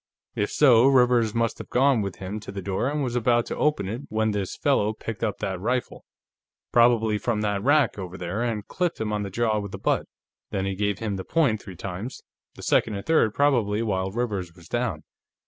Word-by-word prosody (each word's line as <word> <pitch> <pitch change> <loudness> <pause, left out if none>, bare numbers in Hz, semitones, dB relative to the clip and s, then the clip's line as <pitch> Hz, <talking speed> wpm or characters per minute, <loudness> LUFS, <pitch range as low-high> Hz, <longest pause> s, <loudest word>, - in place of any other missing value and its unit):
If 105 - -1
so, 125 -4 +5
Rivers 125 -4 +4
must 115 -1 0
have - - -8
gone 130 -2 +3
with 100 -3 -4
him 95 +3 -5
to 100 - -9
the 100 -1 -6
door 100 +7 -1
and 150 0 -1
was 125 -2 -2
about 120 0 +2
to - - -4
open 150 -11 +1
it 115 +6 -4
when 110 0 +1
this 100 -3 -3
fellow 110 -7 +2
picked 110 -1 -6
up 110 -3 -1
that 95 -2 -3
rifle, 125 +3 -2 0.7
probably 115 -3 +4
from 110 -2 -1
that 105 -2 0
rack, 145 -2 +3
over 95 -1 -6
there, 90 +5 -3
and 115 -4 -2
clipped 180 -2 -2
him 105 -1 -2
on 105 - -1
the 100 - -4
jaw 110 +1 0
with 100 -2 -6
the - - -4
butt. - - 0 0.4
Then 95 0 -2
he 95 - -1
gave 100 0 -1
him 105 -3 -3
the 95 - -5
point 135 - +1
three 95 -3 -10
times, 100 +7 -6 0.3
the - - -11
second 110 - +2
and 100 - -6
third 155 -10 +3
probably 115 -7 +2
while 95 -3 -1
Rivers 100 -6 -3
was 85 -2 -15
down. 115 -10 -2
110 Hz, 215 wpm, -25 LUFS, 100-120 Hz, 0.7 s, so